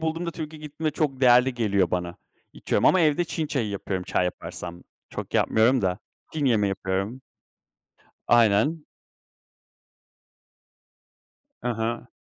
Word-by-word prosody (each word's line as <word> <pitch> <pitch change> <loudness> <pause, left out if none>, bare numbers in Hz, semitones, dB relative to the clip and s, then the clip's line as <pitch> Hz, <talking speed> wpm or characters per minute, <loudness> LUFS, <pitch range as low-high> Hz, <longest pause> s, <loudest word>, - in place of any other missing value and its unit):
bulduğumda, 165 +2 -2
Türkiye'ye 155 -2 -7
gittiğimde 155 +1 -3
çok 145 -4 -1
değerli 125 0 +5
geliyor 100 -7 +1
bana. 90 -1 -2 0.4
İçiyorum - - -1
ama 185 - +5
evde 160 +1 +3
Çin 160 -1 -3
çayı 130 -7 -1
yapıyorum, 95 -2 -4
çay 90 - 0
yaparsam. 90 -1 -6 0.3
Çok - - -7
yapmıyorum 120 +3 +3
da. 90 -1 0 0.3
Çin 155 -2 -2
yemeği 110 -6 +3
yapıyorum. 95 +6 -3 1.0
Aynen. 120 +7 +3 2.8
I - - -1
hı. 115 +2 -3
120 Hz, 120 wpm, -25 LUFS, 100-150 Hz, 2.8 s, değerli